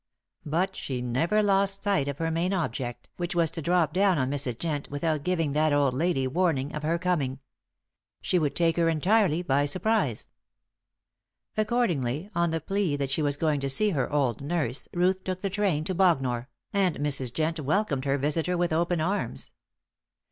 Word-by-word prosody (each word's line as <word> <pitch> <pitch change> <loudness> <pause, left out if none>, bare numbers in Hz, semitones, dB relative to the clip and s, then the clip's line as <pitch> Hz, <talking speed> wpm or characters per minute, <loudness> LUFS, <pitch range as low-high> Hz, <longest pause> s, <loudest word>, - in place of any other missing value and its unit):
But 180 +6 0
she 130 -2 -4
never 150 - +1
lost 195 -1 +1
sight 200 -9 +1
of 140 -1 -3
her 165 +1 -1
main 170 +4 0
object, 135 -9 -3
which 175 0 -3
was 165 -2 +2
to 165 - -4
drop 170 -1 +2
down 190 -1 +3
on 130 -1 0
Mrs. 135 -5 -1
Jent 150 -2 -3
without 150 +1 -1
giving 165 -4 0
that 155 +1 +2
old 145 -2 +2
lady 140 -1 +1
warning 145 -1 0
of 150 - -4
her 160 +3 0
coming. 160 -7 -1 0.8
She 180 - +1
would 150 -3 -1
take 165 -1 +2
her 165 -1 +3
entirely 180 +1 +2
by 140 -2 +2
surprise. 185 - 0 1.3
Accordingly, 195 - 0
on 170 0 +1
the 165 0 -1
plea 195 -1 -1
that 140 -2 -2
she 150 - +1
was 145 -1 0
going 155 -2 +1
to 135 0 -2
see 210 +10 +2
her 135 -7 -1
old 135 -6 0
nurse, 145 -4 -2
Ruth 185 +2 +1
took 185 -1 -4
the 195 - -2
train 190 -6 +1
to 185 - -2
Bognor, 135 -10 +1 0.2
and 190 -4 +2
Mrs. 135 -4 -1
Jent 160 +4 -1
welcomed 150 -2 0
her 140 0 +1
visitor 160 +5 0
with 175 -2 0
open 170 0 +1
arms. 195 +6 -3
160 Hz, 180 wpm, -27 LUFS, 140-180 Hz, 1.3 s, down